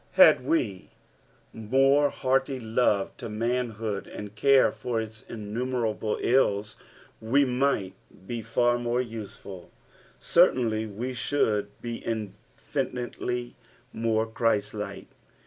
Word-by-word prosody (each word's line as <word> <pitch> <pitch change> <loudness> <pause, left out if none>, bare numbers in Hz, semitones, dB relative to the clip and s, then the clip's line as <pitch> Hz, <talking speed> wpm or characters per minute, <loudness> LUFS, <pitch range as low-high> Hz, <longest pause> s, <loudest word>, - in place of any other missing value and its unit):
Had - - +7
we 125 - -1 0.6
more 135 +6 +3
heart; 135 +1 +1
love 115 -5 0
to - - -6
manhood, 115 -2 -2
and 105 -1 -8
care 135 +5 +4
for 120 -2 -3
its 110 -1 -6
innumerable 110 0 -2
ills, 110 -4 +2 0.5
we 135 +6 +3
might 125 -7 0 0.3
be 120 +2 -4
far 120 +2 +1
more 120 +1 0
luelul; 105 -5 -9 0.5
certainly 110 -3 +3
we 115 +5 -4
should 110 -5 0
be 120 -1 -4
iofinitelj 120 +3 -4 0.4
more 110 -1 +1
Christ 110 -2 0
like. 105 -1 -6
115 Hz, 105 wpm, -27 LUFS, 105-125 Hz, 0.6 s, Had